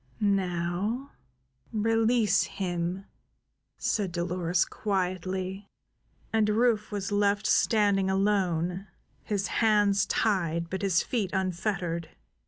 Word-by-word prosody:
"Now 195 +5 -1 0.6
release 225 -1 +2
him!" 180 0 -3 0.7
said 200 -4 -1
Dolores 175 0 0
quietly, 190 0 -3 0.6
and 220 -1 +3
Rufe 220 -1 +2
was 200 -1 -3
left 205 +1 +2
standing 200 -3 +3
alone, 190 -2 0 0.3
his 200 -2 -2 0.2
hands 205 -3 +3
tied, 170 -6 0
but 190 - -3
his 190 -3 +2
feet 220 -7 -1
unfettered. 180 -3 -2
195 Hz, 90 wpm, -28 LUFS, 180-210 Hz, 0.7 s, and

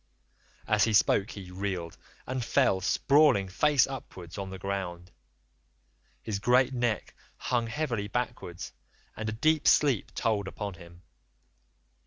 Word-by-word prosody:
"As 105 -1 +4
he 110 - 0
spoke 100 +1 +3
he 95 -5 -9
reeled, 90 -3 -4 0.3
and 130 -1 -3
fell 120 -7 +2
sprawling 140 0 +4
face 145 +8 +3
upwards 90 -10 -9
on 100 -1 -5
the 95 - -7
ground. 90 -2 -4 1.1
His 105 -3 -3
great 125 +4 +3
neck 120 -3 -1 0.2
hung 120 -2 -1
heavily 115 -6 -2
backwards 115 -6 -4 0.4
and 110 0 -3
a - - -2
deep 155 +7 +1
sleep 140 -8 +4
took - - -7
hold 105 -4 +1
upon 100 +1 -5
him. 85 -1 -15
105 Hz, 135 wpm, -29 LUFS, 95-125 Hz, 1.1 s, As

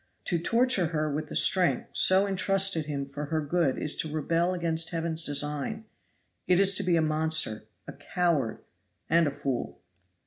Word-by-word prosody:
To 175 -4 0
torture 230 -1 +2
her 155 -2 -2
with 155 +1 -4
the - - -8
strength 185 -2 +2
so 190 +1 +4
intrusted 195 -4 +1
him 140 -2 -3
for 145 +2 -7
her 155 +2 -2
good 155 -1 0
is 150 - -1
to 155 - -3
rebel 165 +3 0
against 165 -2 -1
heaven's 165 -1 0
design 150 +9 -2 0.6
it 180 0 +3
is 195 0 +5
to 200 - -2
be 180 -2 +1
a 165 - +2
monster, 155 -8 0 0.2
a - - -8
coward, 145 - -2 0.5
and 165 -1 +4
a - - -1
fool! 135 -2 -4
165 Hz, 170 wpm, -27 LUFS, 150-180 Hz, 0.6 s, is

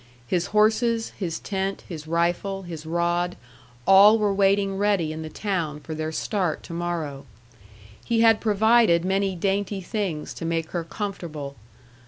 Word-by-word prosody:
His 175 +8 0
horses, 225 +2 +2
his 170 -5 -3
tent, 195 0 -3
his 160 -3 -8
rifle, 175 +4 0
his 165 -3 -8
rod, 175 +1 0 0.5
all 200 +3 +8
were 210 -2 +1
waiting 195 0 +2
ready 195 -6 +1
in 160 - -6
the 160 - -6
town 165 -5 -2
for 155 - -7
their 155 0 -3
start 180 -1 -2
to - - -9
morrow. 165 -5 -4 0.8
He 230 -1 +1
had 225 -1 +5
provided 215 -4 +4
many 190 0 0
dainty 195 +2 -1
things 185 -5 -3
to - - -8
make 165 -1 -2
her 170 -2 -2
comfortable. 165 -7 -6
185 Hz, 150 wpm, -24 LUFS, 165-205 Hz, 0.8 s, all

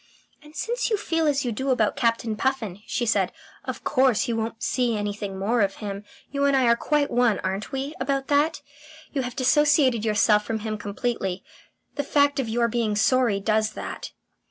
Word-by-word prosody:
"And 300 +1 -16
since 485 +2 -1
you 430 - +1
feel 330 -5 0
as 285 -2 +1
you 240 - 0
do 265 +5 -3
about 230 -5 +2
Captain 230 -2 0
Puffin," 220 -6 -2
she 240 - -1
said, 200 -5 +1 0.3
"of - - -5
course, 260 -5 +2
you 235 - -1
won't 225 0 -4
see 245 -3 +1
anything 205 -1 -4
more 220 +5 +1
of 195 -1 +1
him. 200 -1 -6 0.3
You 280 0 0
and 280 -1 +3
I 260 - +3
are 235 -1 +5
quite 295 +3 0
one, 240 -4 +3
aren't 190 +2 -3
we, 275 +2 -3
about 275 -1 -1
that? 295 +3 +1 0.5
You 275 - 0
have 250 -1 -5
dissociated 270 -3 +3
yourself 210 -1 +3
from 220 0 -3
him 215 0 -3
completely. 200 -3 -3 0.5
The 285 - 0
fact 285 0 +2
of 245 -4 -1
your 235 +1 +2
being 230 -2 -1
sorry 230 -1 +2
does 215 +1 +1
that." - - -6
235 Hz, 190 wpm, -25 LUFS, 210-275 Hz, 0.5 s, are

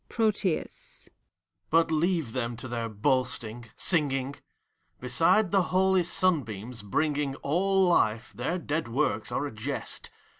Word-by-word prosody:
PROTHUS. 210 -6 -1 0.6
But 165 0 +3
leave 160 -6 +1
them 120 -2 -2
to 120 - -6
their 115 -1 -3
boasting, 120 0 -1
singing!. 140 -5 +1 0.7
Beside 165 - +2
the 195 -1 +4
holy 190 0 +2
simbeams, 125 - 0
bringing 145 +6 0
All 190 +5 +2
life, 115 -9 +2
their 175 - -2
dead 155 -4 -2
works 115 -4 -1
are 145 - -1
a 145 - -4
jest. 125 +6 -2
145 Hz, 120 wpm, -28 LUFS, 120-175 Hz, 0.7 s, the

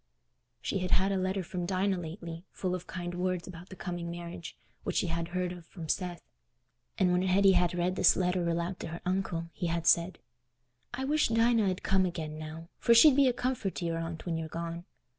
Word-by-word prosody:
She 195 - -1
had 180 0 -2
had 190 +2 +3
a - - +1
letter 190 0 0
from 175 0 -4
Dinah 190 0 +1
lately, 170 0 -7
full 185 -2 -3
of 180 0 -4
kind 175 -1 -5
words 180 0 -1
about 180 0 -10
the 190 - -9
coming 175 -2 -4
marriage, 170 0 -7 0.3
which - - -3
she - - +2
had 165 -1 -2
heard 180 0 -2
of 175 -2 -10
from 165 -3 -8
Seth; 175 +2 -2 0.7
and 185 -2 +3
when 180 0 +3
Hetty 190 +1 +5
had 175 -1 +2
read 180 +1 +1
this - - +5
letter 180 -1 +1
aloud 170 +2 -2
to - - -5
her 165 +1 -7
uncle, 180 -3 -1
he 175 - -2
had 170 0 -1
said, 170 +2 +4 0.7
"I 265 +2 -3
wish 300 +2 +3
Dinah 230 -2 +3
'ud 185 - -3
come 190 -1 +3
again 155 -3 -5
now, 155 +1 -7
for 235 - +5
she'd 270 +4 +8
be 280 -1 +5
a - - +5
comfort 245 -5 -2
to 175 - -3
your 165 -1 -1
aunt 165 0 -5
when 165 -2 -1
you're 160 - -4
gone. 170 +1 -5
180 Hz, 215 wpm, -30 LUFS, 170-190 Hz, 0.7 s, she'd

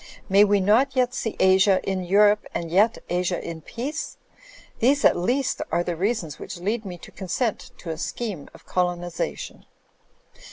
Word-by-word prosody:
May 200 +2 +6
we 205 -1 +3
not 240 +8 +3
yet 250 -1 +2
see 225 -3 -3
Asia 190 +1 +5
in 190 -1 -1
Eu 185 +3 +1
rope 210 0 +4
and 165 -1 -3
yet 210 +6 +4
Asia 180 0 -1
in 165 -1 -7
peace? 270 - -5 0.6
These 280 +5 +3
at - - +6
least 245 +10 0
are 175 - +1
the 175 -1 -3
reasons 180 - -2
which - - -7
lead 210 +5 -2
me 180 -2 -6
to - - -13
consent 220 +6 -3
to 165 - -6
a 160 - -6
scheme 200 -7 -4
of - - -17
colonisation." 175 -1 -3
195 Hz, 170 wpm, -24 LUFS, 175-230 Hz, 0.6 s, May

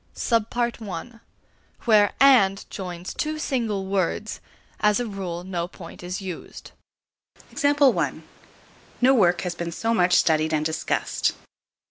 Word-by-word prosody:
AND. 225 -2 +3 0.4
(a) 225 +7 -7 0.6
Where 210 -4 +5
"and" 215 -8 +5
joins 180 -2 -6
two 310 0 -2
single 230 -10 -1
words, 195 +2 -2 0.4
as 210 +1 +3
a 245 - -1
rule 185 -5 -5
no 175 -2 -3
point 175 -2 -12
is 180 +1 -4
used. 185 -4 -8 0.9
No 280 -2 0
work 180 -8 +3
has 180 -2 -3
been 170 0 -5
so 225 +7 -1
much 180 -4 +3
studied 155 -1 +3
and 155 0 -1
discussed. 160 0 -1
195 Hz, 120 wpm, -24 LUFS, 175-230 Hz, 0.9 s, Where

